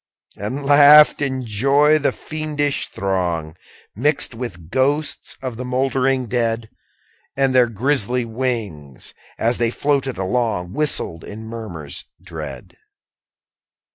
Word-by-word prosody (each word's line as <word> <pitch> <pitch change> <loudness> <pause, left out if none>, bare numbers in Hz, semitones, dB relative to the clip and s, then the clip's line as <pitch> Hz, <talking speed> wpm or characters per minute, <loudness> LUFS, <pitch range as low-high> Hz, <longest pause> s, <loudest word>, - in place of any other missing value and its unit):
15. 105 +7 -4
And 145 - -6
laughed, 145 +1 +7
in 130 -2 -1
joy, 140 +8 +3
the 145 - +1
fiendish 150 -2 -2
throng, 85 -5 -2 0.4
Mixed 145 +4 +1
with 95 -9 -8
ghosts 140 +3 -1
of 125 -3 -4
the 125 - -5
mouldering 130 0 0
dead: 115 -1 -1 0.7
And 135 -1 +2
their 125 -1 +5
grisly 125 +1 0
wings, 110 - -4 0.2
as 115 +2 0
they 120 -1 +2
floated 135 +1 -1
along, 95 -2 -1
Whistled 140 - -1
in 110 +2 -9
murmurs 105 -11 -7
dread. 80 -6 -9
125 Hz, 115 wpm, -20 LUFS, 100-140 Hz, 0.7 s, laughed